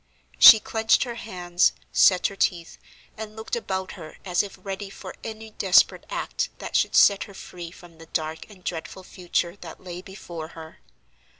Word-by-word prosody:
She 220 - +11
clenched 220 +1 +2
her 245 -2 -5
hands, 180 -6 0 0.2
set 185 -2 +5
her 200 - 0
teeth, 170 -3 -1 0.4
and 215 0 -7
looked 220 +2 -4
about 190 -5 -3
her 160 -5 -11
as 180 -2 +2
if 200 -2 -8
ready 195 +1 -6
for - - -9
any 220 0 -8
desperate 190 -3 +3
act - - -3
that - - -7
should - - +2
set 200 -1 +5
her 200 - -14
free 175 -2 -9
from 170 -1 -16
the 165 - -13
dark 160 +2 -4
and 190 -4 -16
dreadful 175 +2 -6
future 175 -1 -2
that 170 -4 -10
lay 180 -1 -7
before 175 -4 -8
her. 160 0 -11
185 Hz, 175 wpm, -25 LUFS, 175-205 Hz, 0.4 s, She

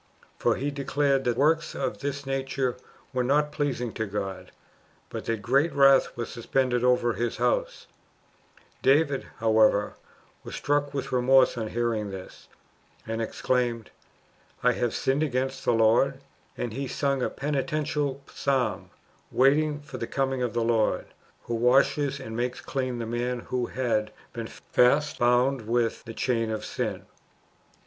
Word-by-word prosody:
For - - +2
[he 145 +2 -2
declared] 140 -1 0
that 120 -1 +1
works 160 +4 +2
of - - -2
this 140 0 -4
nature 135 -1 -1 0.4
were 125 0 +1
not 150 +3 +2
pleasing 140 -6 -2
to 110 - -3
God, 95 -1 -5 0.6
but - - -6
that 115 -3 -2
great 140 +8 +3
wrath 135 -3 +5
was 120 - -3
suspended 125 +1 0
over 125 -1 +3
his 120 +1 -2
house, - - 0 1.0
David, 140 0 +3
however, 110 -2 +3 0.5
was - - -7
struck 145 0 0
with 140 -1 -4
remorse 130 +1 +4
on 110 -2 -3
hearing 115 -2 -1
this, 95 -1 -10 0.6
and 115 0 -3
exclaimed, 120 0 -1 0.7
^'I 125 0 +4
have 120 0 -1
sinned 135 +3 +1
against 135 -2 -1
the - - +4
Lord 115 +5 +3 0.2
;" - - -35
and 120 -3 -3
he 135 +3 -3
sung 140 0 0
a - - +1
penitential 145 0 -2
psalm, 130 -5 -1 0.4
waiting 145 +3 +3
for 145 - -9
the - - -3
coming 135 -1 -1
of 120 -2 -1
the 120 - +1
Lord, 115 -2 +1 0.4
who 120 - -4
washes 135 +4 +3
and 110 - -7
makes 125 +1 -2
clean 130 -3 -3
the 115 - -3
man 120 +1 -2
who 125 -1 -2
had 115 -4 -1 0.2
been 115 -1 -5
fast 145 +8 +2
bound 125 0 +2
with 115 -1 0
[the 115 - -7
chain 115 -3 0
of] 110 -1 -3
sin. - - -3
125 Hz, 150 wpm, -27 LUFS, 115-140 Hz, 1.0 s, wrath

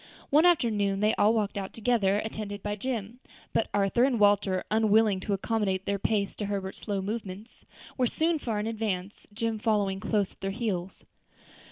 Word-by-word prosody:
One 310 +5 +6
afternoon 210 - +2
they 215 +1 +3
all 205 +1 +4
walked 210 -3 0
out 195 -1 -6
together, 210 -4 +2
attended 205 -2 -5
by 205 0 -2
Jim; 230 0 -4 0.3
but - - +1
Arthur 205 +4 +2
and 255 -3 +2
Walter, 205 -2 +3
unwilling 215 -2 +3
to 200 - -2
accommodate 195 -2 -1
their 200 0 -1
pace 200 -1 0
to 205 - -3
Herbert's 195 -1 -4
slow 200 -3 -3
movements, 210 +1 -6 0.3
were 250 - +3
soon 320 +5 0
far 225 -6 -2
in 210 - -2
advance, 210 -4 -3
Jim 225 +1 -2
following 205 -3 +1
close 205 0 0
at - - -25
their 195 - -2
heels. 195 -4 -3
210 Hz, 175 wpm, -28 LUFS, 195-225 Hz, 0.3 s, One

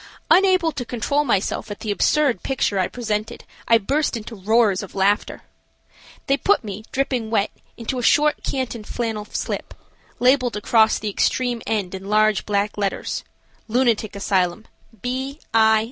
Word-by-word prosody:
Unable 370 -3 +5
to 275 -4 -4
control 250 +5 0
myself 220 -7 -1
at 205 - -7
the 215 - -2
absurd 285 +5 +2
picture 245 -7 0
I 185 - +2
presented, 225 -1 -4 0.2
I 230 - +6
burst 270 +5 0
into 230 +1 -8
roars 210 0 +2
of 200 - -10
laughter. 200 +2 +1 0.8
They 275 - +2
put 405 +2 +2
me, 210 0 -7
dripping 255 -4 -1
wet, 215 -2 +1 0.3
into 245 +2 -3
a - - -2
short 300 +5 +3
canton 250 -4 -3
flannel 220 -1 -3
slip, - - -4 0.4
labeled 250 -2 +3
across 220 +1 +3
the 210 -1 -3
extreme 245 +3 0
end 200 -5 -1
in 190 +1 -7
large 215 -1 +2
black 205 0 0
letters, 200 -1 -2 0.4
"Lunatic 230 -3 +1
Asylum, 195 0 0 0.4
B. 265 +4 -3
I. 220 -1 +5
225 Hz, 150 wpm, -22 LUFS, 210-255 Hz, 0.8 s, I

